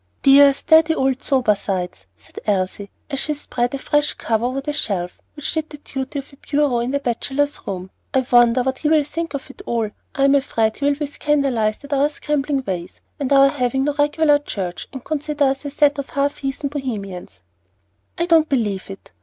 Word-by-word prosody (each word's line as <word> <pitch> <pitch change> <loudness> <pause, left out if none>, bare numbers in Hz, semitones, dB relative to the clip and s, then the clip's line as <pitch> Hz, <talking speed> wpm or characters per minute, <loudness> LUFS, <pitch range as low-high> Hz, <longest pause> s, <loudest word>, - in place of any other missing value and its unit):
"Dear, 280 +1 +8
steady 320 +1 +4
old 265 0 0
Sobersides!" 200 - 0
said 80 - -12
Elsie, 200 0 -1 0.2
as 275 - -2
she 300 +1 -1
spread 245 -3 -2
a - - -2
fresh 295 +2 0
cover 225 0 -1
over 255 +2 -1
the 295 +2 -3
shelf 185 -11 -3
which 295 - -4
did 315 -1 -2
duty 270 +1 -4
for 275 +1 -17
a - - -35
bureau 285 -4 +1
in 240 +1 -1
the 280 - +1
Bachelors' 280 +3 -1
Room; 185 -1 -5 0.2
"I 260 -1 +1
wonder 240 0 +5
what 260 +1 -2
he 300 - 0
will 310 -1 +4
think 330 +1 -4
of 275 - -6
it - - -14
all. 225 -3 -1 0.2
I'm 275 0 +4
afraid 225 -6 +1
he 280 - -2
will 285 0 +3
be 295 +1 -3
scandalized 275 -7 0
at 285 0 -5
our 280 +1 +3
scrambling 290 -2 -1
ways, 175 -4 -5 0.2
and 280 -2 -2
our 275 0 +7
having 265 -1 0
no 295 +1 0
regular 295 0 +3
church, 190 -11 -5
and 265 -2 -8
consider 300 -1 -1
us 270 +1 +1
a - - -2
set 290 0 +2
of 280 - -5
half 280 +1 0
heathen 275 +1 -3
Bohemians." 200 - -6 0.7
"I 340 - +1
don't 325 -2 +4
believe 210 -9 -1
it. 195 0 -10
275 Hz, 195 wpm, -21 LUFS, 230-290 Hz, 0.7 s, Dear